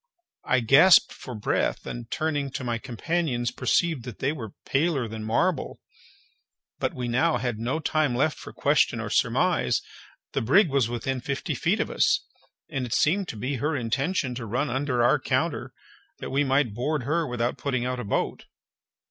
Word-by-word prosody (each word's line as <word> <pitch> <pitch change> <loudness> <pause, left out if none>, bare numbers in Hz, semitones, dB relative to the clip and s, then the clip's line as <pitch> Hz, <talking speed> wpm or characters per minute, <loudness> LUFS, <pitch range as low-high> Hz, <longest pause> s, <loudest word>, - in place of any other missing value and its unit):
I 130 -1 +2
gasped 140 +11 +6
for 125 - -8
breath, 105 - -1
and 120 -1 -6
turning 145 -3 -1
to 130 - -4
my 120 -2 -2
companions, 125 -1 -1
perceived 155 +3 +1
that 125 -4 -7
they 135 - 0
were 115 -10 -7
paler 140 -3 +1
than 110 0 -6
marble. 115 +12 0 1.0
But - - -1
we 125 - -3
had 125 -2 0
now 120 +3 -1
no 160 - -1
time 155 -5 +1
left 150 +5 +1
for - - -9
question - - +2
or - - -4
surmise—the - - -1
brig 160 - +4
was 135 -4 +1
within 125 +2 -3
fifty 140 +2 -3
feet - - 0
of - - -1
us, - - +2 0.4
and 135 - -3
it 115 - -1
seemed 185 +5 +2
to - - -6
be 130 +6 -2
her 150 +5 -1
intention 135 +3 -1
to 120 -2 -6
run 125 +7 -1
under 130 -2 0
our 120 - +4
counter, - - -1 0.5
that - - -6
we 140 +2 +2
might 135 -4 +1
board 145 +5 -1
her 160 +4 0
without 120 -1 -2
putting 130 -4 -1
out 125 0 -2
a - - -3
boat. 100 - -2
130 Hz, 175 wpm, -26 LUFS, 120-150 Hz, 1.0 s, gasped